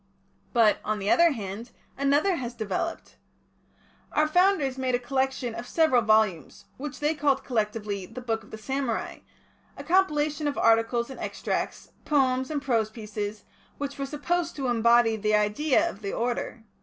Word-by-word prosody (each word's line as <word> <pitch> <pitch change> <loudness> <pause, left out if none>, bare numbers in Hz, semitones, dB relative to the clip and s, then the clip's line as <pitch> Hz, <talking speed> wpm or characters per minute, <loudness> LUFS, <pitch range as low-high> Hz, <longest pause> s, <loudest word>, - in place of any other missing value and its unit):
But, 225 -3 +4
on 215 0 -1
the 200 0 -1
other 340 0 +6
hand, 215 +1 -6 0.3
another 290 +7 +2
has 245 -2 -5
developed. 220 - -4 0.9
Our 305 0 +2
Founders 355 -6 +3
made 255 -1 +1
a - - +3
collection 260 -1 -1
of 235 +2 -7
several 315 -7 +3
volumes, 215 -6 +1
which 290 +1 -6
they 300 +2 +2
called, 285 -3 +1
collectively, 210 -4 -2
the 225 +5 -8
Book 225 -3 -2
of 210 - -17
the 220 - -8
Samurai, 265 0 -3 0.6
a - - -7
compilation 305 -5 +1
of 285 - -2
articles 230 +2 +2
and - - -9
extracts, - - -3
poems 260 -3 +1
and 295 -2 -3
prose 230 -5 +1
pieces, 210 -1 -6 0.3
which 280 -1 -5
were 275 - -2
supposed 330 +4 -2
to 270 -3 -2
embody 235 -1 +4
the 215 0 +1
idea 260 +10 +2
of 210 - -7
the 200 -1 -4
order. 240 -1 -2
245 Hz, 160 wpm, -27 LUFS, 220-290 Hz, 0.9 s, other